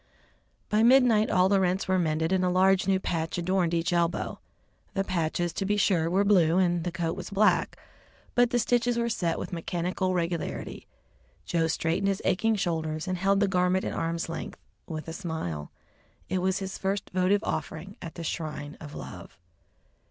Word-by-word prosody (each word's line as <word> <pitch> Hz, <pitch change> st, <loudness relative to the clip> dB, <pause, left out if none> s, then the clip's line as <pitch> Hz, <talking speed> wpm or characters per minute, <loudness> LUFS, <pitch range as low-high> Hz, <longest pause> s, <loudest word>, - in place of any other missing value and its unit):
By 210 Hz, +1 st, +2 dB
midnight 235 Hz, -3 st, +5 dB
all 185 Hz, 0 st, +4 dB
the 195 Hz, 0 st, +3 dB
rents 185 Hz, +1 st, 0 dB
were 185 Hz, 0 st, +2 dB
mended 160 Hz, 0 st, 0 dB
and 190 Hz, -1 st, +2 dB
a 180 Hz, -, +2 dB
large 185 Hz, +1 st, +3 dB
new 190 Hz, -1 st, +3 dB
patch 165 Hz, -3 st, -2 dB
adorned 175 Hz, 0 st, +1 dB
each 170 Hz, +1 st, 0 dB
elbow. 170 Hz, -1 st, 0 dB, 0.6 s
The 195 Hz, -, +1 dB
patches, 175 Hz, -2 st, -1 dB
to 195 Hz, -, -2 dB
be 205 Hz, +2 st, +1 dB
sure, 170 Hz, -5 st, +2 dB
were 190 Hz, +3 st, +3 dB
blue, 180 Hz, -5 st, +4 dB
and 175 Hz, -2 st, +2 dB
the 175 Hz, -, -2 dB
coat 170 Hz, -1 st, -2 dB
was -, -, -7 dB
black, 205 Hz, +1 st, +2 dB, 0.6 s
but 245 Hz, -1 st, +4 dB
the 245 Hz, -, +1 dB
stitches 240 Hz, +1 st, +1 dB
were 235 Hz, 0 st, 0 dB
set 170 Hz, -7 st, -1 dB
with -, -, -6 dB
mechanical 180 Hz, +2 st, -1 dB
regularity. 170 Hz, -1 st, -3 dB, 0.6 s
Joe 165 Hz, -2 st, +1 dB
straightened 165 Hz, +3 st, 0 dB
his 195 Hz, -1 st, -1 dB
aching 225 Hz, +4 st, +2 dB
shoulders 160 Hz, -3 st, -2 dB
and 185 Hz, -1 st, -2 dB
held 195 Hz, +2 st, +2 dB
the 205 Hz, -, +4 dB
garment 185 Hz, 0 st, +1 dB
at -, -, -2 dB
arm's 165 Hz, 0 st, -2 dB
length 165 Hz, -, -6 dB, 0.3 s
with 155 Hz, -2 st, -6 dB
a 165 Hz, -, -5 dB
smile. 160 Hz, -, -4 dB, 0.6 s
It 185 Hz, +1 st, 0 dB
was 190 Hz, +1 st, +1 dB
his 190 Hz, -1 st, -5 dB
first 195 Hz, +1 st, -2 dB
votive 185 Hz, +2 st, +2 dB
offering 180 Hz, +6 st, -4 dB
at 165 Hz, -, -8 dB
the 170 Hz, -, -6 dB
shrine 150 Hz, -2 st, -4 dB
of 150 Hz, -2 st, -9 dB
love. 90 Hz, -4 st, -9 dB
180 Hz, 180 wpm, -27 LUFS, 165-195 Hz, 0.6 s, midnight